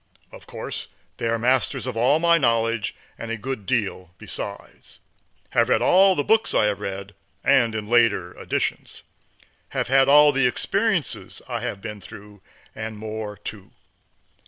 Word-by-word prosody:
Of - - -14
course - - -6 0.3
they 115 - -2
are 115 0 +1
masters 125 +2 +1
of 130 -3 -4
all 125 +6 +3
my 170 +1 +4
knowledge, 115 -4 +1 0.2
and 115 - -6
a 115 - -2
good 115 -3 -5
deal 95 -7 -2
besides; - - -8 0.5
have - - +2
read - - +3
all 190 +1 +5
the 145 - 0
books 220 +5 +2
I - - +4
have 105 -1 0
read, 100 +1 -6 0.3
and 115 -4 +3
in 105 -1 -4
later 120 0 +2
editions; - - -3 0.7
have - - -1
had 135 0 +4
all 150 +1 +7
the 135 -2 +2
experiences 125 - -1
I - - -3
have 100 - -5
been 105 -2 -7
through, 100 +2 -12 0.3
and 110 0 -6
more 110 -1 -6
too. 100 -1 -9
115 Hz, 155 wpm, -23 LUFS, 105-130 Hz, 0.7 s, all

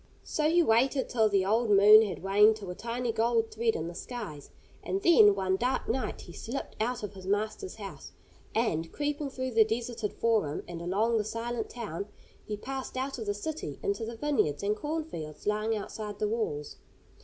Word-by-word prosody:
So 305 0 0
he 345 +1 +5
waited 260 +2 +2
till 220 -3 +3
the 195 -2 +2
old 225 +3 +2
moon 210 +2 +9
had 205 -4 -3
waned 210 +3 +5
to 200 -4 -7
a - - -4
tiny 235 +4 -3
gold 225 0 +1
thread 225 0 +1
in 160 +1 -3
the 170 - -6
skies, 190 - -7 0.3
and 385 - -2
then, 210 -12 +7
one 190 -1 0
dark 250 +4 0
night, 255 +3 -2
he - - -11
slipped 250 +5 -5
out 240 0 -1
of 205 - -5
his 190 -1 -10
master's 215 - -1
house, - - -9 0.4
and, 165 -8 0
creeping 290 -1 -2
through 260 -1 -4
the 225 -1 +6
deserted 225 -1 -3
forum 215 -11 0
and 170 -1 -6
along 215 +6 +1
the - - 0
silent 230 +1 -3
town, 205 -5 -5 0.4
he 210 - -4
passed 265 +3 -5
out 265 0 -3
of 220 - -5
the 205 - 0
city 205 - -5
into 200 +3 -1
the 230 +1 -5
vineyards 225 - 0
and 205 +1 +1
corn 310 +7 -2
fields 155 - -8
lying 215 +2 +1
outside 210 0 -6
the 210 - 0
walls. 205 -10 -3
220 Hz, 195 wpm, -29 LUFS, 200-245 Hz, 0.4 s, moon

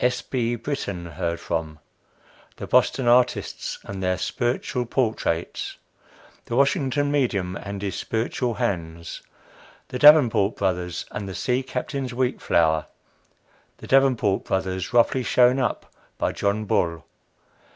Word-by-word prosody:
S. 125 0 +1
B. 120 -2 -1
BRITTAN 100 - -4
HEARD 85 +2 -3
FROM. 80 -2 -3 0.8
THE - - -7
BOSTON 130 - +2
ARTISTS 125 +1 +2
AND 95 -1 -7
THEIR 90 0 0
SPIRITUAL 120 +3 -2
PORTRAITS. 110 -9 -1 0.7
THE 115 - -4
WASHINGTON 140 +1 +2
MEDIUM 100 -10 0
AND 100 0 -6
HIS 95 -3 -3
SPIRITUAL 115 +1 -2
HANDS. 85 -4 -3 0.7
THE 125 - -4
DAVENPORT 120 -9 +6
BROTHERS 90 -3 -2
AND 100 -2 -5
THE 95 - -6
SEA 125 0 0
CAPTAIN'S 130 0 -4
WHEAT 130 0 -1
FLOUR. 80 -2 +2 0.9
THE - - -11
DAVENPORT 130 -7 +3
BROTHERS 95 -1 -2
ROUGHLY 120 +2 +3
SHOWN 125 +1 +4
UP 125 - -2 0.2
BY - - 0
JOHN 105 +2 -1
BULL. 85 -4 0
115 Hz, 125 wpm, -24 LUFS, 90-125 Hz, 0.9 s, DAVENPORT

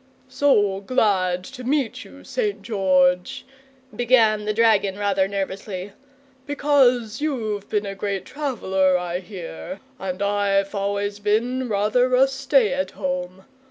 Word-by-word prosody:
"So 205 -9 +2
glad 190 -6 +1
to 255 +5 -10
meet 270 -1 -1
you, - - -15
St. 425 -5 -2
George," 185 -4 +1 0.5
began 225 -4 +3
the 215 - 0
dragon 210 -3 +3
rather 200 -2 +1
nervously, 195 0 -4 0.6
"because 260 -5 +2
you've 220 -9 -2
been 210 -1 0
a 195 - -4
great 195 -1 -3
traveller, 190 -10 0
I 180 0 -3
hear, 175 - -8 0.2
and 185 -1 -4
I've 200 -1 +1
always 200 0 -2
been 235 +5 0
rather 220 +5 +2
a 265 +2 +5
stay 270 -3 +2
at 280 +1 -1
home. 185 -1 -4
205 Hz, 125 wpm, -23 LUFS, 190-250 Hz, 0.6 s, a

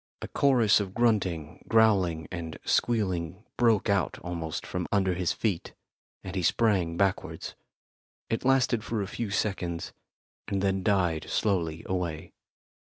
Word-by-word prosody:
A - - -4
chorus 120 -7 +4
of 100 -2 -4
grunting, 95 -10 0
growling 95 -8 +3
and 85 -3 -5
squealing 95 -4 0
broke 115 -4 +3
out 100 -2 +1
almost 85 -1 -4
from 90 -1 -3
under 95 -2 +2
his 90 -1 0
feet, 100 -7 -2 0.5
and 95 0 -6
he 95 - 0
sprang 90 -3 +2
backwards. 95 -1 -1 0.7
It 115 - -2
lasted 130 -4 +3
for 115 -3 -2
a - - -5
few 110 +1 -4
seconds, 95 -4 -2 0.5
and 100 - -1
then 95 0 +1
died 90 -5 +1
slowly 85 -6 0
away. 85 -4 -3
95 Hz, 135 wpm, -28 LUFS, 85-110 Hz, 0.7 s, chorus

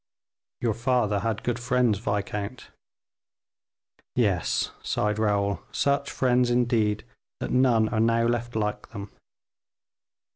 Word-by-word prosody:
"Your 115 -2 +1
father 115 -3 +1
had 115 +1 -2
good 120 0 -1
friends, 120 -3 +2
viscount." 105 +2 -3 1.4
"Yes," 100 -9 +1
sighed 105 0 -1
Raoul, 100 -2 +1
"such 140 0 +1
friends, 125 -1 +2
indeed, 115 -4 +1 0.3
that - - -4
none 125 -4 +4
are 110 - -1
now 115 +1 +3
left 120 0 -1
like 105 -1 -2
them." 100 0 -8
115 Hz, 110 wpm, -26 LUFS, 105-120 Hz, 1.4 s, none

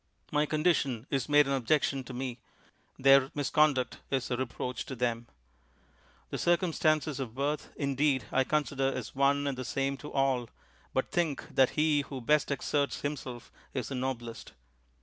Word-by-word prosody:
My 150 0 +2
condition 150 -7 +1
is 135 -1 -1
made 145 0 +6
an 140 - 0
objection 135 +1 +1
to - - -8
me; 125 -1 -4 0.6
their 135 0 +6
misconduct 145 -2 +2
is 135 -2 -1
a - - +2
reproach 125 -1 -3
to 130 - -5
them. 120 -1 -1 1.0
The - - -3
circumstances 155 -4 +2
of 120 -4 -5
birth, 145 +2 -2
indeed, 140 -3 +1
I 135 - +3
consider 135 -2 0
as - - -5
one 140 +1 +2
and 140 -2 -1
the 130 - -5
same 135 +2 -1
to 150 - -9
all; 135 -4 +1 0.4
but - - -1
think 165 -6 -1
that 130 -1 +5
he 150 -1 +3
who 140 -1 -7
best 150 +4 +2
exerts 140 0 -1
himself 130 -4 -5 0.2
is 125 -4 -2
the - - -4
noblest. 125 -3 -4
135 Hz, 160 wpm, -30 LUFS, 130-150 Hz, 1.0 s, made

